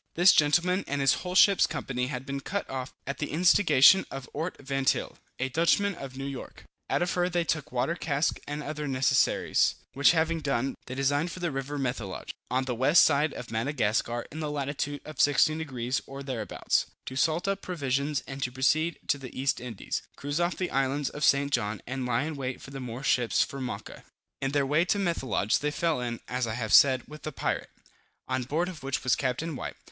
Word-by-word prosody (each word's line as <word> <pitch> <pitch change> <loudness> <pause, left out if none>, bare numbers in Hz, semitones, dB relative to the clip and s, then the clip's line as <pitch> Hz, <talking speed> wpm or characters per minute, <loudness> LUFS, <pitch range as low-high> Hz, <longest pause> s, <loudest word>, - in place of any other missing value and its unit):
This 175 +2 +7
gentleman 175 +6 +3
and 145 - -2
his 135 -1 +4
whole 180 0 -5
ship's 200 0 +6
company 125 -4 -3
had 130 -1 -5
been 140 0 -3
cut 200 +8 -3
off 130 0 -5
at 140 - -4
the 145 - -2
instigation 170 0 +6
of 135 -2 -7
Ort 160 +5 -3
Vantyle, 135 -1 -1 0.2
a 130 - -1
Dutchman 170 +8 +2
of 135 -5 -9
New 135 - -4
York. 140 -2 -7 0.3
Out - - +2
of 175 - -1
her 180 0 +1
they 175 -1 +1
took 155 -3 -2
water 130 +6 0
casks 150 -3 -1
and 145 +1 -4
other 150 0 -4
necessaries; 135 0 +2 0.2
which 140 +5 +5
having 165 0 +1
done, 135 -3 -1
they 130 - -5
designed 145 +5 +1
for 185 - -8
the 175 -3 -1
river 135 +2 -4
Methelage, 125 -8 -3 0.2
on 130 +2 0
the 130 - -2
west 135 +7 +5
side 150 0 +3
of 120 - -8
Madagascar, 115 -1 0
in 155 - -7
the 155 -1 -2
lat. 140 -1 -2 0.2
of 155 - -3
16 145 +2 +4
degrees 130 -5 -2
or 135 +1 -7
thereabouts, 125 -6 -1 0.2
to 130 - -6
salt 160 +7 +1
up 195 0 -1
provisions 140 -4 -1
and 135 0 -7
to 125 - -1
proceed 155 +6 +1
to 140 - +1
the 130 -1 -8
East 135 0 +1
Indies, 120 -5 -4
cruise 145 +3 -3
off 175 +1 0
the 185 - -2
islands 135 +1 0
of 150 - -5
St. 140 0 +3
John, 105 -6 0
and 130 0 -3
lie 120 +2 +1
in 155 0 -4
wait 130 -2 -4
for 135 - -11
the 135 - -6
Moor 125 +1 -6
ships 125 -4 +2
from 135 -1 -5
Mocha. 105 -3 -7 0.4
In 135 - 0
their 140 -1 +2
way 150 +5 +3
to 190 +3 +1
Methelage 135 - 0
they 150 - 0
fell 155 -2 0
in 120 -1 -4
(as 125 -1 -1
I 110 - -3
have 110 -3 -2
said) 130 -3 +7
with 150 0 -11
the 155 - -5
pirate, - - -2 0.6
on 130 0 -1
board 160 +7 0
of 180 -4 -8
which 135 +1 -2
was 130 - +3
Capt. 130 +2 -1
White. 160 -5 -5
140 Hz, 210 wpm, -28 LUFS, 130-155 Hz, 0.6 s, This